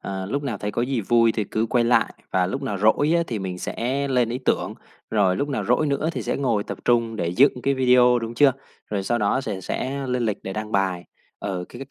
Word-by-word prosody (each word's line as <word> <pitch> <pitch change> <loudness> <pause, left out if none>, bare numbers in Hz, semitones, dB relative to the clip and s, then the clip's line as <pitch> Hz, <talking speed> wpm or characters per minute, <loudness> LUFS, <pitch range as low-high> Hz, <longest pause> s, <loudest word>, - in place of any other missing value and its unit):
Ờ, 95 -1 -5
lúc 140 +8 -2
nào 120 -7 -3
thấy 105 - -3
có 120 - -1
gì 130 -1 -1
vui 115 +2 +3
thì 105 - -1
cứ 110 +3 -1
quay 120 +1 +2
lại, 120 +1 +2 0.2
và 90 -1 +2
lúc - - -4
nào 100 -2 -3
rỗi 110 - +3
á 170 - +2
thì 115 -3 -3
mình 95 -2 -5
sẽ 135 +8 -2
lên 125 -3 +2
ý 125 +2 -3
tưởng, - - 0 0.4
rồi 100 -4 +2
lúc 145 - -1
nào 140 - -2
rỗi 125 +6 +2
nữa 140 +2 0
thì - - -4
sẽ - - -2
ngồi 115 -7 0
tập - - -6
trung 115 -2 +2
để 85 -4 -1
dựng 125 +6 +3
cái 140 0 +2
video, 125 -1 +5
đúng 115 0 -5
chưa? 135 +1 +5 0.4
Rồi 100 -2 -1
sau 120 +4 0
đó 105 +4 +1
sề 105 -8 -4
sẽ 135 +8 -3
lên 125 -1 -1
lịch 105 - -1
để 95 - -5
đăng 110 +1 -5
bài. 95 -3 0 0.4
Ừ, 95 -3 -3
cái 125 +3 -8
c 135 - -29
115 Hz, 255 wpm, -23 LUFS, 100-130 Hz, 0.4 s, video